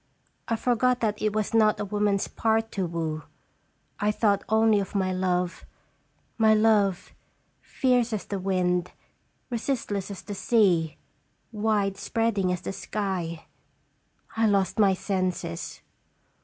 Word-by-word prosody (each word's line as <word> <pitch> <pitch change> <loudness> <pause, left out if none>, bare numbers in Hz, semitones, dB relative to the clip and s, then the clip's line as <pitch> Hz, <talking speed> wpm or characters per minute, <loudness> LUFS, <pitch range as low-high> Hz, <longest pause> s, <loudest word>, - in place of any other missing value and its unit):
I 230 - +1
forgot 250 +2 +1
that 215 -2 -1
it 215 - +1
was 215 +1 -2
not 215 -1 +4
a 210 - -2
woman's 205 -1 0
part 225 0 0
to 190 -3 -2
woo. 160 -2 -3 0.8
I 210 +1 +2
thought 205 -2 +1
only 220 -1 +4
of 195 +1 -5
my 190 -1 +1
love 180 -1 -1 0.8
my 220 -1 +5
love, 210 -4 +2 0.5
fierce 250 -3 +1
as 215 -3 -3
the 200 - -4
wind, 180 -2 0 0.6
resistless 230 -5 -2
as 200 - -8
the 205 - -6
sea, 185 -7 +2 0.5
wide 210 -3 0
spreading 205 -2 0
as 180 - -2
the - - -5
sky! 185 -6 -4 0.9
I 225 0 +3
lost 200 0 +1
my 195 -3 +5
senses. 185 - -3
205 Hz, 130 wpm, -26 LUFS, 185-220 Hz, 0.9 s, my